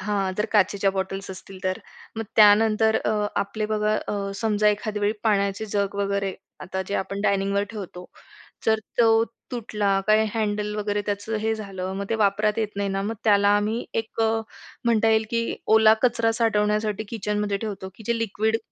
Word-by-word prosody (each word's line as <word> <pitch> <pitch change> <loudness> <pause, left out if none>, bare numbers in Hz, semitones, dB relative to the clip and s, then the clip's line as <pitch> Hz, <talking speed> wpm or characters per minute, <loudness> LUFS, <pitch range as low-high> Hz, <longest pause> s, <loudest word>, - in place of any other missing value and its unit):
हां, 195 -1 -1
जर 210 - +1
काचेच्या 200 -1 +3
बॉटल्स 195 0 -4
असतील 190 0 -10
तर. 185 0 0 0.4
मग 225 - -3
त्यानंतर 220 +1 +5
अ, - - +1 0.3
आपले 210 +2 -3
बघा 215 0 +1
अ, 200 -1 -2
समजा 210 -1 +2
एखाद्या 210 0 -1
वेळी 205 +1 +2
पाण्याचे 200 -1 +1
जग 200 -1 0
वगैरे 200 -1 -1 0.3
आता 190 +1 -4
जे 200 - -2
आपण 195 0 -2
डायनिंगवर 200 0 +1
ठेवतो. 185 -4 -8 0.6
जर 220 -1 +4 0.2
तो 225 -1 +5 0.3
तुटला 210 -5 0
काही 215 +1 +4
हँडल 210 -1 -1
वगैरे 205 0 -1
त्याचं 205 +2 -2
हे 220 +1 0
झालं, 195 -3 -5
मग 200 - -3
ते - - +2
वापरात 210 0 +1
येत 220 -2 0
नाही 200 0 -1
ना, 195 0 -1
मग 215 +3 -2
त्याला 205 -2 +4
आम्ही 215 +3 -1
एक 225 0 -3
अ, 225 0 +2 0.4
म्हणता 225 -1 +3
येईल 220 0 +3
की 230 - +1 0.3
ओला 220 0 +7
कचरा 235 -2 +2
साठवण्यासाठी 215 -2 +1
किचनमध्ये 210 -2 -1
ठेवतो, 195 -3 -5
की 220 - -13
जे 235 0 +1
लिक्विड 220 0 0
210 Hz, 175 wpm, -24 LUFS, 200-220 Hz, 0.6 s, ओला